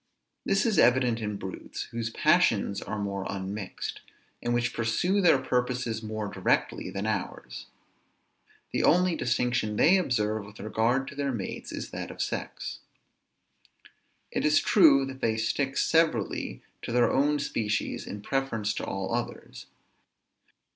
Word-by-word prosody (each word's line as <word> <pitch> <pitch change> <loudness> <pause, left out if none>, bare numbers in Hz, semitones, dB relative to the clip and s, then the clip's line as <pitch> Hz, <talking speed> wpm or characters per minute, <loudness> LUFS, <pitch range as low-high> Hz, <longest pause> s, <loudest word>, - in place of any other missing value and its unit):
This 195 - +2
is 220 -4 +2
evident 125 -2 +4
in 105 -1 -3
brutes, 95 -1 -6
whose 115 -1 -3
passions 115 - +2
are 110 - -4
more 100 -1 -3
unmixed, 95 0 -5 0.4
and 120 - -1
which 120 0 +1
pursue 175 - +1
their 170 -6 +6
purposes 125 -3 -1
more 110 -1 -4
directly 95 -2 0
than 100 +1 -4
ours. 90 - -4 1.0
The - - 0
only 180 0 +4
distinction 120 -5 0
they 180 - +5
observe 110 - 0
with 100 +1 -14
regard 115 +6 0
to - - -11
their 140 -1 -1
mates, 110 -6 -5
is - - -6
that - - -5
of - - -10
sex. - - -4 1.5
It - - -1
is 150 0 +5
true, 145 -9 +5
that 135 0 -8
they 110 -1 +1
stick 135 +4 -1
severally 160 -11 +1 0.2
to - - -5
their 120 0 +3
own 145 +2 +2
species 105 -7 -2
in 100 0 -7
preference 115 -7 -1
to - - -4
all 95 +2 -3
others. 120 0 -5
120 Hz, 140 wpm, -28 LUFS, 105-135 Hz, 1.5 s, their